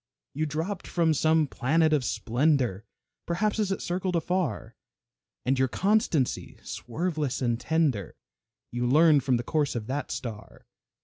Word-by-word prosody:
You 155 +2 -1
dropped 165 +6 -3
from 165 -2 +2
some 155 +1 +3
planet 155 +4 +2
of 145 -4 +2
splendor, 125 -4 0 0.4
Perhaps 210 +5 0
as 205 -2 +1
it 195 - -2
circled 180 +1 -1
afar, 175 +1 -1 0.7
And 130 +1 +1
your 130 - +3
constancy, 185 - 0
swerveless 150 +1 -3
and 120 -2 0
tender, 140 - 0 0.6
You 120 0 -1
learned 150 +1 +5
from 130 -2 +2
the 120 - -3
course 145 +1 0
of 115 -2 -3
that 135 +4 -3
star. 115 -5 -7
150 Hz, 140 wpm, -27 LUFS, 125-165 Hz, 0.7 s, learned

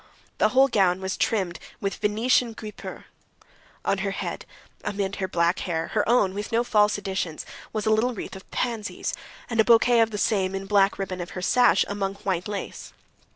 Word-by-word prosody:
The 215 - +4
whole 265 +4 +5
gown 190 -7 +2
was 190 0 -3
trimmed 190 -6 0 0.2
with 195 0 -2
Venetian 230 +3 +2
guipure. 215 -1 -8 0.8
On 195 - +1
her 195 +1 -1
head, 195 - -5 0.4
among 195 -1 -2
her 190 -1 -2
black 170 0 +1
hair—her 175 +5 -1
own, 210 -6 +3
with 205 +1 -5
no 230 +1 +2
false 210 -3 +3
additions—was 195 +2 -5
a 220 - +3
little 230 +3 +2
wreath - - -6
of 190 - -12
pansies, 230 -3 -3 0.3
and 230 -2 -3
a - - +8
bouquet 235 +1 +5
of 225 -1 +4
the 210 - -5
same 195 -2 +1
in 195 - -3
the - - -11
black 200 -1 +3
ribbon 185 -2 -4
of 175 - -6
her - - -3
sash 250 +6 +4
among 200 -1 -2
white 185 -2 -1
lace. 205 -1 -6
205 Hz, 185 wpm, -25 LUFS, 190-220 Hz, 0.8 s, a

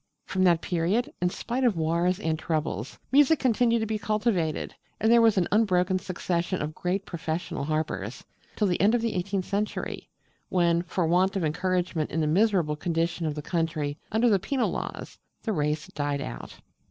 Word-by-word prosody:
From 185 -1 0
that 170 -2 +4
period, 180 +8 0
in 180 - +3
spite 245 +7 -3
of 230 -8 +3
wars 170 +3 +1
and 160 -5 -1
troubles, 150 - -2
music 290 +3 +5
continued 235 -2 +2
to - - 0
be 220 0 -2
cultivated, 205 -7 0 0.3
and 220 - +3
there 235 0 +7
was 225 -3 +4
an 180 - +2
unbroken 185 -3 +3
succession 180 -1 -2
of 150 +1 -3
great 185 +5 -2
professional 160 -4 -3
harpers, 135 -8 -3 0.3
till 210 - +1
the 180 -3 +1
end 210 +4 +5
of 240 - +1
the 230 - 0
eighteenth 185 +1 -2
century, 210 +1 -3 0.4
when, 170 -2 +3
for 175 0 -1
want 180 +4 +2
of 185 -4 0
encouragement 180 0 -1
in 160 - -2
the 155 - +2
miserable 175 -2 +2
condition 165 +1 -1
of 150 - -2
the 150 - -5
country 160 -4 -2
under 220 +3 +3
the 205 -4 +4
penal 250 +7 0
laws, - - -6 0.2
the 220 - -1
race 150 -2 -1
died 145 -1 -2
out. - - -7
180 Hz, 180 wpm, -27 LUFS, 160-210 Hz, 0.4 s, there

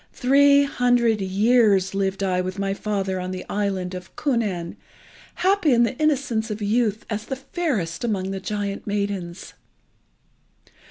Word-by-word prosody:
Three 280 +2 +5
hundred 245 -5 +2
years 200 0 +3
lived 195 0 -1
I 185 -1 +1
with 185 +1 -5
my 195 0 -1
father 195 -2 -2
on 180 0 -4
the 185 0 -5
island 195 -3 -2
of 185 0 -9
Kunnan, 210 - -1 0.6
happy 375 -6 +2
in 235 0 +4
the 235 +2 0
innocence 275 -7 0
of 210 0 -4
youth, 215 0 0
as 215 0 -4
the 265 - -3
fairest 260 - -3
among 195 -5 -1
the 195 - -3
giant 200 +1 -4
maidens. 200 -4 -3
205 Hz, 145 wpm, -23 LUFS, 190-245 Hz, 0.6 s, Three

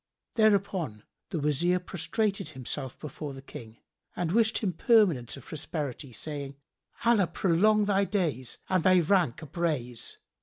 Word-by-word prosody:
Thereupon 195 - +1 0.3
the 180 - -2
Wazir 150 +5 +2
prostrated 195 +3 -2
himself 130 +1 -5
before 145 -1 -7
the 135 - -9
King 115 -4 -10 0.4
and 170 -2 -1
wished 220 +2 +3
him 195 -5 -1
permanence 170 - +3
of 135 - -13
prosperity, 145 -3 -5
saying, 140 +2 -5 0.5
"Allah 225 -6 +4
prolong 200 +5 +3
thy 200 -1 +2
days 165 - -1
and 185 -3 +1
thy 185 -1 +6
rank 170 -6 +2
upraise! 145 -7 -3
170 Hz, 130 wpm, -29 LUFS, 140-195 Hz, 0.5 s, thy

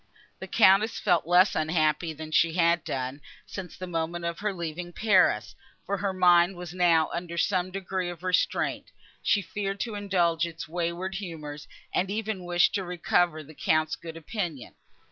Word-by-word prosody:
The - - -7
Countess 210 +1 +4
felt 170 -2 +2
less 180 +3 +5
unhappy 155 +1 +1
than 155 0 -8
she 165 0 +3
had 170 -1 +3
done, 130 +2 -4 0.2
since 185 -4 -8
the 185 - -5
moment 170 0 -3
of 170 0 -3
her 210 0 -1
leaving 175 -1 -5
Paris; 180 - +3 0.3
for 200 +1 -1
her 195 +1 -1
mind 180 0 +4
was 175 -1 -8
now 170 -3 +3
under 170 0 -5
some 185 +1 +1
degree 185 -1 -3
of 175 0 -9
restraint; 185 -1 0 0.3
she 205 - +2
feared 195 +2 -4
to 230 - -3
indulge 175 -5 +1
its 165 -2 -8
wayward 175 +3 -3
humours, 160 -6 -7 0.3
and 185 +1 +1
even 210 -3 -3
wished 175 +1 +3
to 200 - -1
recover 175 -2 0
the 155 +2 -14
Count's 155 +1 +1
good 165 -1 -9
opinion. 165 - -5
175 Hz, 165 wpm, -27 LUFS, 165-190 Hz, 0.3 s, less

